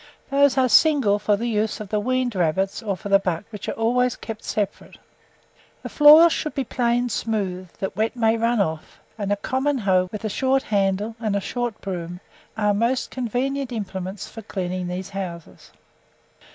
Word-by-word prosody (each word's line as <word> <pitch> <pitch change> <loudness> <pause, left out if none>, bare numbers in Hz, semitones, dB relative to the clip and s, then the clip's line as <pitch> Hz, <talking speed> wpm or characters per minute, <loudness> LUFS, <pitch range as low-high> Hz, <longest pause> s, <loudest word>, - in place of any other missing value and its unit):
Those 280 -1 +4
are 260 -1 +4
single 250 -5 +4
for 210 0 +2
the 230 - -3
use 220 -2 -1
of 210 -2 -7
the 210 - 0
weaned 255 +2 0
rabbits, 190 +3 0
or 200 -4 -2
for 200 - -7
the 195 0 +6
bucks, 185 +3 -3
which 210 -3 -6
are - - -2
always 245 +2 +1
kept 220 -1 -8
separate. 205 -2 -4 0.9
The - - -5
floors 310 +3 +8
should 305 - -3
be 275 - 0
planed 245 0 0
smooth, 190 -5 -2
that 195 - -5
wet 220 +4 -1
may 225 -2 +2
run 230 0 +1
off, 160 -5 -3 0.2
and 205 -2 -3
a - - +3
common 265 +7 -1
hoe, 185 -5 +1
with 215 0 -6
a - - +1
short 265 +5 +1
handle, 200 +2 0
and 215 -3 -1
a - - +2
short 240 +2 -4
broom, 175 -2 -5 0.4
are 210 -1 +2
most 235 +5 0
convenient 260 +2 -2
implements 195 -3 -5
for 225 - -9
cleaning 185 -3 -4
these 180 +2 -5
houses. 180 -4 -7
215 Hz, 180 wpm, -23 LUFS, 195-245 Hz, 0.9 s, floors